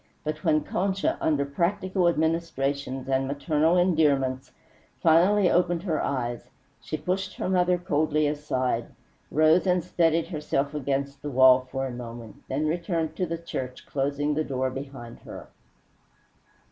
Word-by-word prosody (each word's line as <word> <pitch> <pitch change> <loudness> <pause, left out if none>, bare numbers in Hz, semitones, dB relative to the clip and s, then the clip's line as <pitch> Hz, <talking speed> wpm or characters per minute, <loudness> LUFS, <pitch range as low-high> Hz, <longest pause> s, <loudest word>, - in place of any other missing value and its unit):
But 155 0 -4
when 155 -2 +3
Concha, 195 +1 -1
under 145 -3 +1
practical 185 +5 0
administrations 145 -5 -1
and 135 0 +1
maternal 150 +4 +1
endearments, 145 -7 +2 0.5
finally 180 +5 +4
opened 175 -1 +1
her 165 -6 -1
eyes, 120 -3 -3 0.3
she 155 - -4
pushed 185 +2 -3
her - - -3
mother 180 -1 +2
coldly 155 -2 +1
aside, 130 -5 -1 0.4
rose 155 +5 +4
and 180 -1 +2
steadied 165 -2 +1
herself 150 -4 -2
against 140 -1 -2
the 150 - -4
wall 130 -1 +5
for 135 0 -2
a 130 - -4
moment, 120 -2 -8
then 145 +4 -1
returned 165 -1 -1
to 180 - 0
the 165 +1 -3
church, 130 -6 -6
closing 145 +2 -1
the 155 +1 0
door 130 -2 -2
behind 135 -3 -8
her. - - -10
150 Hz, 140 wpm, -26 LUFS, 135-170 Hz, 0.5 s, wall